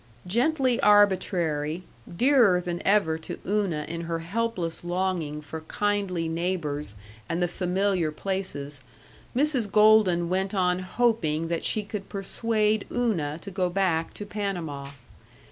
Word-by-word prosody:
Gently 255 - +1
arbitrary, 180 -6 +3 0.3
dearer 240 -8 +5
than 175 -1 -4
ever 195 -6 +2
to 160 - -7
Una 190 -7 0
in 170 0 -4
her 165 0 -2
helpless 175 -1 -2
longing 175 -4 -2
for 155 +2 -7
kindly 195 -1 -1
neighbors 160 - -2 0.3
and 165 - -1
the 175 - +2
familiar 180 -1 0
places, 150 -6 -4 0.5
Mrs. 260 -6 +1
Golden 210 -5 +5
went 190 +3 -1
on 180 -1 +2
hoping 185 -6 0
that 170 -1 -1
she 215 - 0
could 205 -1 -6
persuade 215 +1 0
Una 175 -12 0
to 195 - -7
go 185 -1 0
back 175 -3 0
to 205 - -6
Panama. 175 -10 -4
185 Hz, 130 wpm, -26 LUFS, 165-210 Hz, 0.5 s, dearer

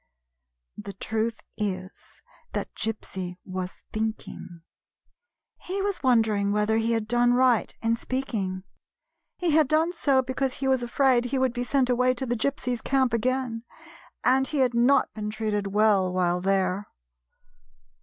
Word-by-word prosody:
The 200 - -7
truth 220 +3 -2 0.2
is, 185 -3 -5 0.3
that - - -3
Gypsy 190 -5 -4
was 185 -1 -6
thinking. 215 -5 -5 1.0
He 380 +2 -4
was 400 -1 -2
wondering 220 -6 +2
whether 210 +1 +1
he 225 +1 +1
had 225 -2 -1
done 240 +1 +3
right 250 -3 +3
in 225 0 +2
speaking. 220 -8 -3 0.7
He 350 -2 0
had 305 -1 +4
done 320 +4 +2
so 275 -6 +2
because 260 +1 -1
he 270 - -2
was 260 -1 +2
afraid 245 0 +2
he 260 +2 -1
would 260 -2 +1
be 245 0 -2
sent 265 0 +1
away 250 +1 +2
to 265 - -3
the 240 -1 -1
Gypsies' 250 -1 -2
camp 260 -3 +1
again, 245 0 -1 0.6
and 265 +1 +3
he 305 - -3
had 245 - -2
not 250 +4 +3
been 210 -1 -4
treated 210 -2 -2
well 200 -2 +3
while 180 -1 +1
there. 195 +1 0
235 Hz, 145 wpm, -26 LUFS, 210-260 Hz, 1.0 s, had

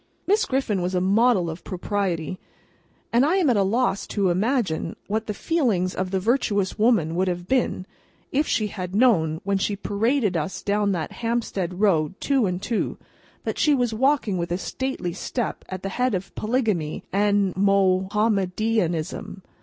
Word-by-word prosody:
Miss 415 +3 +3
Griffin 255 -8 0
was 180 +1 -1
a - - +3
model 200 0 +3
of 165 +1 -6
propriety, 185 -3 -2 0.7
and 240 +2 +5
I 315 +6 +3
am 350 -9 +3
at - - +2
a 200 - +3
loss 200 0 +1
to 195 -4 +1
imagine 195 -4 0
what 220 +2 -2
the 210 - -2
feelings 220 - 0
of 185 0 -2
the 190 0 0
virtuous 205 -3 0
woman 210 -8 +3
would 185 +2 +1
have 175 -1 -3
been, 250 -7 0 0.5
if 290 +3 +1
she 215 - +1
had 190 -2 -5
known, 170 -10 +3
when 200 0 0
she 205 +1 0
paraded 210 +1 0
us 165 +3 -3
down 205 0 +1
the 170 -5 -1
Hampstead 210 -6 -2
Road 185 -3 +2
two 270 -7 +2
and 180 0 -2
two, 230 -3 -1 0.5
that - - -3
she 300 -2 +4
was 245 -3 0
walking 245 -5 +1
with 170 0 -3
a 175 - +1
stately 260 -4 -3
step 235 +5 -3
at 185 -1 -6
the 195 - -2
head 250 +1 0
of 185 +1 -5
Polygamy 215 -9 -1
and 200 -1 +2
Mahomedanism. 195 -1 +1
200 Hz, 170 wpm, -24 LUFS, 185-235 Hz, 0.7 s, and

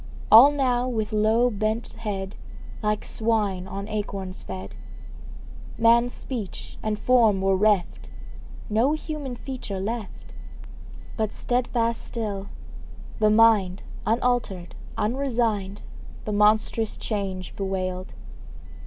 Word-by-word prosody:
All 235 +6 +10
now 255 -4 +1
with 220 -3 -2
low 220 +3 +3
bent 215 +2 -2
head, 195 -3 -4 0.5
Like 210 -1 -1
swine, 210 -5 0
on 195 +1 -5
acorns 200 -3 -4
fed; 95 0 -7 1.0
Man's 235 +1 +4
speech 230 -8 -7
and 215 -1 -1
form 225 -4 +4
were 195 0 +2
reft, 200 -2 +1 0.6
No 230 +7 +2
human 305 -4 -4
feature 240 -7 -6
left; 215 +2 -5 0.8
But 220 -2 0
steadfast 240 -2 -1
still, 205 -4 -4 0.7
the 215 -1 +4
mind, 210 -4 +4 0.2
Unaltered, 225 -6 0 0.2
unresigned, 225 -5 -1 0.4
The 215 - -2
monstrous 215 +1 +2
change 195 -4 -4
bewailed. 185 -1 -3
215 Hz, 100 wpm, -25 LUFS, 195-235 Hz, 1.0 s, All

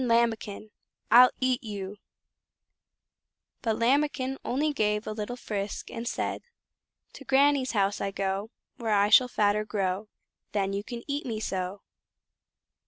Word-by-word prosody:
Lambikin! 225 -3 0 0.4
I'll 250 +2 +9
EAT 255 -1 +1
YOU!" 205 -2 -6 1.6
But 225 -3 0
Lambikin 270 +1 +1
only 295 +4 0
gave 210 -4 0
a - - -3
little 215 +3 -4
frisk 205 -4 -4
and 230 +1 -5
said: - - -2 0.7
"To - - -11
Granny's 275 0 +3
house 200 -1 +1
I 200 - 0
go, 195 +1 -2 0.3
Where 225 -3 0
I 205 +1 +4
shall 250 +3 +7
fatter 210 -3 +2
grow, 200 -1 -2 0.4
Then 195 -1 0
you 200 +1 -2
can 235 +1 -7
eat 285 -1 -2
me 220 -3 -3
so." 190 -1 -3
215 Hz, 135 wpm, -28 LUFS, 205-250 Hz, 1.6 s, I'll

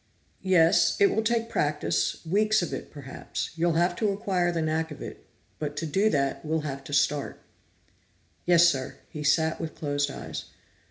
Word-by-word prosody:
"Yes. 175 -3 +4
It 200 - +5
will 220 - +2
take 230 +1 0
practice, 145 - -1
weeks 210 +3 +2
of - - -4
it, - - -5
perhaps. 140 -3 -6
You'll 170 0 +1
have 175 +2 +2
to 215 - +1
acquire 190 -3 0
the 165 -2 -1
knack 160 +1 0
of 150 - -9
it, - - -9 0.3
but 150 -1 -4
to 165 - -2
do 195 +8 +2
that, 140 -4 0
we'll 160 0 -1
have 140 -2 -5
to - - -9
start." 145 0 +1 1.1
"Yes, 175 -1 +7
sir." 135 -6 -1
He 150 - -6
sat 160 +2 +2
with 160 -1 -5
closed 145 -1 -1
eyes. - - -6
160 Hz, 175 wpm, -27 LUFS, 145-180 Hz, 1.1 s, Yes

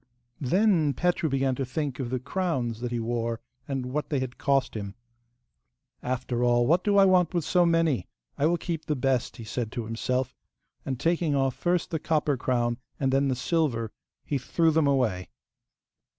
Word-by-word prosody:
Then 160 - +2
Petru 175 +1 +1
began 135 -1 +1
to 135 - -2
think 135 0 -3
of 125 -3 -2
the 130 - -1
crowns 130 - -2
that 125 - -2
he 120 - -1
wore, 115 0 -2 0.3
and 135 -2 -2
what 150 0 -2
they 145 - 0
had 130 -1 -5
cost 135 -3 +1
him. 100 -2 -5 1.1
'After 125 -1 -2
all, 120 0 +4
what 170 +7 +3
do 205 -1 +3
I 195 - +7
want 180 -2 +3
with 170 -4 0
so 175 -1 +3
many? 165 - +2 0.3
I 145 - +2
will 175 +1 +2
keep 165 -2 -4
the 150 - 0
best,' 130 -2 0
he 115 - -8
said 110 +1 -3
to 120 - -3
himself; 125 +3 -1 0.5
and 130 -3 -2
taking 165 -3 +1
off 135 -1 +1
first 175 +4 0
the 160 - -1
copper 150 -2 +1
crown 120 -1 0 0.2
and 135 -2 +1
then 135 +1 +3
the 130 - +1
silver, 125 -6 0 0.3
he 140 - -1
threw 165 +5 +2
them 155 -2 +3
away. 115 -10 +1
135 Hz, 185 wpm, -27 LUFS, 120-160 Hz, 1.1 s, I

